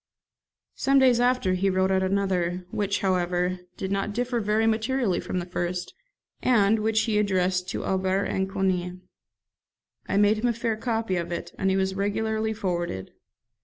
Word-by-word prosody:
Some 275 +1 +2
days 255 -3 +5
after 245 -6 +2
he 190 +2 +1
wrote 190 0 +1
out 190 0 +2
another, 185 -2 0
which, 205 -1 -1
however, 180 -1 0 0.2
did 190 - -4
not 195 +1 -1
differ 245 0 0
very 215 +1 +1
materially 225 -1 +1
from - - -4
the 175 - -2
first, 175 0 -3 0.5
and 220 -3 +3
which 220 +1 +2
he 215 -2 +1
addressed 185 -2 +1
to - - -4
Aubert 190 +1 +1
and 190 0 -1
Coni. 180 -2 -1 1.1
I 195 - +1
made 205 +1 +4
him 240 - +1
a 240 - +2
fair 230 -1 -1
copy 225 -4 -1
of 170 0 -3
it, 170 - -5
and 190 - +1
it 190 - +2
was 190 0 0
regularly 220 +2 -1
forwarded. 175 - -3
195 Hz, 165 wpm, -26 LUFS, 185-220 Hz, 1.1 s, days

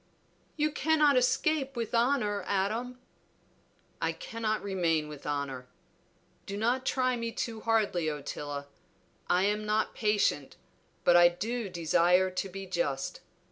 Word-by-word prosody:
"You 305 0 +1
cannot 300 -1 +3
escape 275 +2 +1
with 230 -1 -3
honor, 235 -4 +1
Adam." 220 +6 -1 1.0
"I - - +1
cannot 220 -1 -3
remain 170 -6 0
with 150 -1 -9
honor. 140 -3 -3 0.8
Do 200 0 -4
not 245 +4 0
try 255 -1 +1
me 230 -1 -3
too 225 0 -4
hardly, 210 -8 +1
Ottila. 145 -1 -5 0.6
I 180 +1 +3
am 210 +1 +1
not 215 +1 0
patient, 205 - 0 0.5
but 175 - +5
I 175 0 +8
do 220 +5 -3
desire 180 +2 +3
to 185 +1 -3
be 195 +1 -7
just. 160 -7 -2
205 Hz, 130 wpm, -30 LUFS, 175-235 Hz, 1.0 s, I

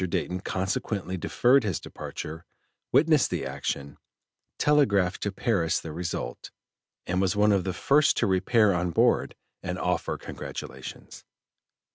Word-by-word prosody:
Dayton 90 +1 -2
consequently 95 0 -2
deferred 125 +8 +3
his 100 -7 -1
departure, 80 +2 -7 0.5
witnessed 155 -1 +4
the - - -2
action, 70 0 -4 0.6
telegraphed 100 -11 +3
to 100 - -1
Paris 95 -6 0
the 80 - -7
result, 85 +1 -4 0.6
and 90 +1 0
was 95 +1 +1
one 105 +1 +4
of 100 -2 +2
the 95 - 0
first 145 +9 +3
to - - +2
repair 100 +2 +3
on 90 0 0
board 85 - +2 0.3
and - - -4
offer - - -1
congratulations. - - -8
95 Hz, 130 wpm, -27 LUFS, 90-110 Hz, 0.6 s, witnessed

